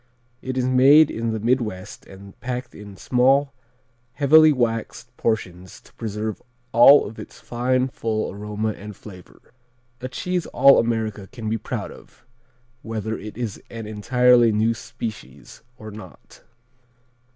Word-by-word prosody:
It 130 0 -5
is 125 - 0
made 135 +4 +5
in 115 0 -3
the 110 - -3
Midwest 110 -5 -2
and 95 0 -13
packed 125 0 -5
in 100 -2 -12
small, 135 +5 +2 0.6
heavily 155 +2 +6
waxed 120 -1 -3
portions 95 -7 -3
to - - -23
preserve 110 -1 -5 0.3
all 130 +5 +7
of 110 - -9
its - - -11
fine, 125 +2 -1
full 110 -4 -3
aroma 105 +2 -4
and 105 -1 -8
flavor. 90 +1 -15 0.5
A 130 - -4
cheese 180 +6 -3
all 135 +2 +5
America 110 -3 -2
can 115 -3 -7
be 110 +1 -1
proud - - -5
of, - - -17 0.6
whether 110 -1 -4
it 105 0 -9
is 115 -5 -5
an 115 -1 -8
entirely 120 +2 +3
new 110 +2 +1
species 110 -1 -9 0.2
or 110 -2 -10
not. 100 -5 -14
115 Hz, 140 wpm, -22 LUFS, 105-125 Hz, 0.6 s, all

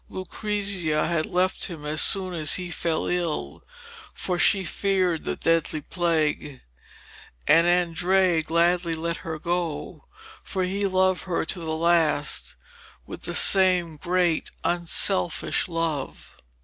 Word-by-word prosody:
Lucrezia 190 -4 -2
had 165 -2 -1
left 185 +1 0
him 160 -5 -7
as 150 +1 +2
soon 185 -2 +4
as 155 -3 +4
he 180 -1 -3
fell 165 -1 -2
ill, 175 -3 -3 0.5
for 180 -2 -3
she 190 +1 +3
feared 185 -2 -1
the - - -2
deadly 165 -1 0
plague, 155 -5 -2 0.9
and 165 +2 +5
Andrea 175 0 +2
gladly 170 +2 +1
let 170 +1 -2
her 160 -1 -6
go, 170 -1 -4 0.4
for 190 -2 -3
he 195 +2 -1
loved 185 -1 +1
her 175 -3 -2
to 180 - -2
the 160 -1 -4
last 165 -3 +1 0.5
with - - -10
the - - -4
same 180 -4 +4
great 175 0 0
unselfish 170 - +1
love. 165 -5 -4
170 Hz, 125 wpm, -24 LUFS, 160-185 Hz, 0.9 s, and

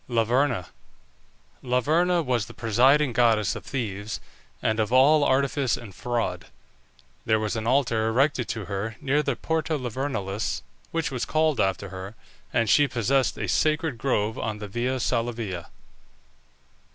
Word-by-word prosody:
LAVERNA. 120 -2 +1 1.0
Laverna 160 +8 +2
was 120 -4 0
the - - -12
presiding 125 +5 +3
goddess 115 -4 +3
of - - -7
thieves, 105 -5 -4 0.4
and 110 0 0
of 110 +1 0
all 145 +4 +6
artifice 135 -1 +1
and 110 -5 -10
fraud. 115 -6 -2 0.8
There 110 0 +2
was 110 0 -2
an 110 0 -3
altar 120 -4 +2
erected 125 +2 +1
to 110 -3 -4
her 105 +2 -4
near 140 +2 +1
the 140 -3 -1
Porta 160 +1 -1
Lavernalis, 115 -6 -3 0.3
which 165 -2 -2
was 125 -3 -2
called 155 -1 +1
after 95 0 -1
her, 95 +3 -8 0.4
and 115 - +1
she 145 +7 +5
possessed 130 +2 +1
a - - -3
sacred 155 -4 +1
grove 110 -4 0
on 110 -1 -3
the 105 0 -7
Via 125 +5 -2
Salavia. 115 -7 -2
120 Hz, 140 wpm, -25 LUFS, 110-140 Hz, 1.0 s, all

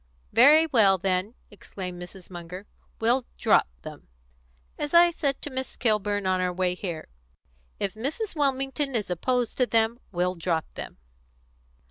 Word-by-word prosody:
"Very 290 +8 +7
well, 220 -10 +4
then," 190 +4 -1 0.2
exclaimed 180 -3 -8
Mrs. 180 +1 -11
Munger, 180 +2 -8 0.3
"we'll 240 +3 +1
drop - - +4 0.2
them. - - -10 0.7
As 295 +3 -2
I 345 0 +7
said 280 -5 -2
to 295 - -5
Miss 260 0 -4
Kilburn 210 -3 0
on 185 0 +1
our 180 0 0
way 180 0 0
here, 175 -4 -6 0.7
'if 195 -2 -1
Mrs. 310 - -4
Wilmington 275 -1 0
is 210 -5 -2
opposed 245 +7 -1
to 250 - +2
them, 225 +1 +2
we'll 180 0 0
drop 165 -2 -1
them.'" - - -8
215 Hz, 145 wpm, -26 LUFS, 185-265 Hz, 0.7 s, Very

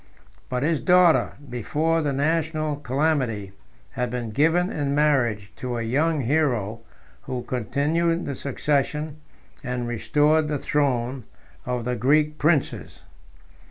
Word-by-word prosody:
But 125 0 -1
his 160 0 +1
daughter, 180 -2 +4
before 155 +7 0
the 145 -2 0
national 155 +1 0
calamity, 130 -7 -1 0.4
had 125 -2 -2
been 120 -2 -4
given 165 - +2
in 140 -2 -1
marriage 120 -9 +1
to 125 -2 -3
a 115 - -2
young 150 +6 +1
hero 120 -6 0 0.5
who 125 -1 -3
continued 155 - 0
the 140 - -3
succession, 145 +3 -1 0.5
and 125 -2 -3
restored 150 +6 +2
the 150 -1 -1
throne, 130 -4 -1 0.4
of 125 -2 -2
the 125 0 -1
Greek 150 +5 +2
princes. 155 -2 0
140 Hz, 125 wpm, -24 LUFS, 125-155 Hz, 0.5 s, daughter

